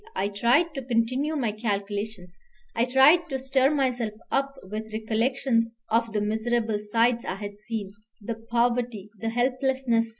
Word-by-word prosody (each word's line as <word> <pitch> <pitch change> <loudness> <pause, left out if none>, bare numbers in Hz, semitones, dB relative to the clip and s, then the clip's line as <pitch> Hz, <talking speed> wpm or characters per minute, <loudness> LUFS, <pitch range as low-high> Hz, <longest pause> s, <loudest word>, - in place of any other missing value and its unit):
I 200 - 0
tried 245 +11 +2
to 270 - -4
continue 255 +5 0
my 245 -7 0
calculations. 205 -3 -4 0.4
I 230 - +3
tried 285 +7 +5
to 270 - -1
stir 265 0 +2
myself 250 -7 0 0.2
up 275 0 0
with 215 +3 -6
recollections 230 +1 0
of 230 0 +2
the 210 -1 0
miserable 220 +1 0
sights 230 +3 +1
I - - -3
had 205 0 -7
seen, 215 -2 -5 0.3
the 230 +2 -4
poverty, 235 -2 -1
the 225 - -2
helplessness. 250 -1 +1
230 Hz, 145 wpm, -26 LUFS, 215-255 Hz, 0.4 s, tried